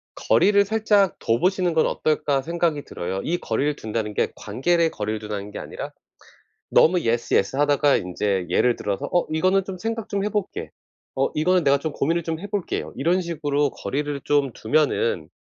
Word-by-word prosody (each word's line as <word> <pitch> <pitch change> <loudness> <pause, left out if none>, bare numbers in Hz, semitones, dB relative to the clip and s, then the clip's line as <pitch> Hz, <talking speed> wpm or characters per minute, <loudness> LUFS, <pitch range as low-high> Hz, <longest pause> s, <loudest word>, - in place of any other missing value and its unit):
'거리를 200 0 +4
살짝 210 -2 +2
둬 115 +1 +1
보시는 185 0 +1
건 160 - +3
어떨까.' 145 -3 0
생각이 165 -1 -1
들어요. 95 +2 -4
이 175 +2 0
거리를 145 +4 -1
둔다는 110 -3 -3
게 - - 0
관계를 165 +10 +1
거리를 105 +1 -3
둔다는 105 -1 -6
게 - - -6
아니라 - - -7 0.8
너무 175 +2 +5
'예스 115 0 -1
예스.' 95 +7 +1
하다가 145 0 +3
인제 95 0 -2
예를 125 -1 +3
들어서 100 -1 -3
'어 175 - +3
이거는 185 +5 +2
좀 190 -1 -6
생각 225 +2 -4
좀 200 -1 -1
해볼게. 210 -1 -3 0.5
어 135 - +2
이거는 180 +3 +2
내가 140 -1 +4
좀 155 0 -3
고민을 165 +4 0
좀 160 -1 -3
해볼게요.' 205 0 -4
이런 175 +7 +2
식으로 145 -4 -1
거리를 145 0 -3
좀 145 -3 +2
두면은 115 - 0
150 Hz, 365 characters per minute, -23 LUFS, 115-180 Hz, 0.8 s, 너무